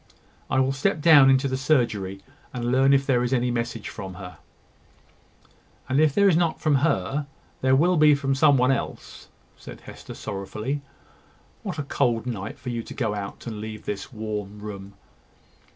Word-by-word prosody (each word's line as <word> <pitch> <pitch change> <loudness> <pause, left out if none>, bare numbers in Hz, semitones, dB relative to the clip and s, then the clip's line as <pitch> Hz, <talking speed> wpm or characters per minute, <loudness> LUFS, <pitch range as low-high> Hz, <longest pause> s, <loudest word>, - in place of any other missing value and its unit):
I - - +2
will 130 0 +2
step 145 +6 0
down 145 -4 +7
into 135 +1 +3
the 130 - -2
surgery, 110 -9 0 0.3
and 120 0 -2
learn 135 +2 +4
if 135 0 +3
there 125 -3 +2
is 125 0 -1
any 125 -1 +1
message 115 -2 -3
from 95 -3 -7
her." 90 -3 -10 1.5
"And 130 +3 +1
if 155 -2 +3
there 200 0 +5
is 185 - +4
not 170 -1 +1
from 150 -4 +2
her, 140 - 0 0.3
there 130 0 +4
will 175 +5 +3
be 150 -1 +6
from 140 -1 -1
some 140 +1 +4
one 125 +1 +3
else," 135 - -5 0.3
said - - -11
Hester, - - -11
sorrowfully. 110 +8 -4 0.8
"What - - -5
a 145 - -2
cold 120 -4 0
night 110 -4 -5
for 125 - -6
you 120 -1 -3
to - - -10
go 110 -5 -1
out, 100 -1 -6
and 110 -3 -6
leave 110 0 -7
this 100 +4 -5
warm 105 -3 -5
room!" 100 -1 -9
125 Hz, 180 wpm, -24 LUFS, 105-140 Hz, 1.5 s, down